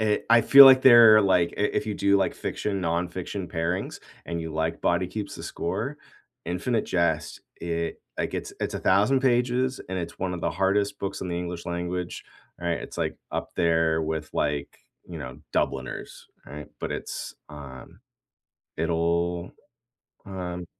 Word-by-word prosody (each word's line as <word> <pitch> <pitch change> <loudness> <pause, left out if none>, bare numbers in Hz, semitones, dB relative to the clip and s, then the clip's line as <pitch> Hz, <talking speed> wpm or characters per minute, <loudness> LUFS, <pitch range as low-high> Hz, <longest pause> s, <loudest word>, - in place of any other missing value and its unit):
Eh, 105 -1 +2
I 115 0 +7
feel 140 +3 +10
like 130 -1 +8
they're 115 -4 +9
like 90 -3 +2
i - - -2
if 105 - 0
you 105 - -1
do 100 0 +3
like 100 - 0
fiction, 100 -2 -3
nonfiction 90 +2 -3
pairings, 85 +2 -2 0.3
and 85 0 -3
you 80 0 -5
like 80 +1 -2
Body 85 +1 +1
Keeps 105 +1 -6
the - - -9
Score, - - -4 0.5
Infinite 105 +7 -1
Jest, 80 -4 -1
it 85 -1 -3 0.2
like - - -2
it's - - -4
it's - - -2
1000 105 +8 +3
pages, 125 0 +1
and 95 - -2
it's 85 -1 -6
one 95 -1 -2
of 85 - -6
the - - -1
hardest 100 +2 0
books 95 0 -4
in 95 - -4
the 85 - -2
English 90 -1 -5
language, 90 0 -4 0.4
right? 85 -3 -1
It's - - -9
like - - -2
up - - -4
there 80 -1 +2
with 80 -1 -3
like, 75 -1 -2 0.3
you - - -7
know, - - -8
Dubliners, 65 -1 -3 0.2
right? 75 +1 -9
But - - -3
it's, - - -6 0.2
um 70 -4 -11 0.8
It'll 85 +1 -1 0.7
um 90 -2 -5
90 Hz, 160 wpm, -26 LUFS, 85-100 Hz, 0.8 s, feel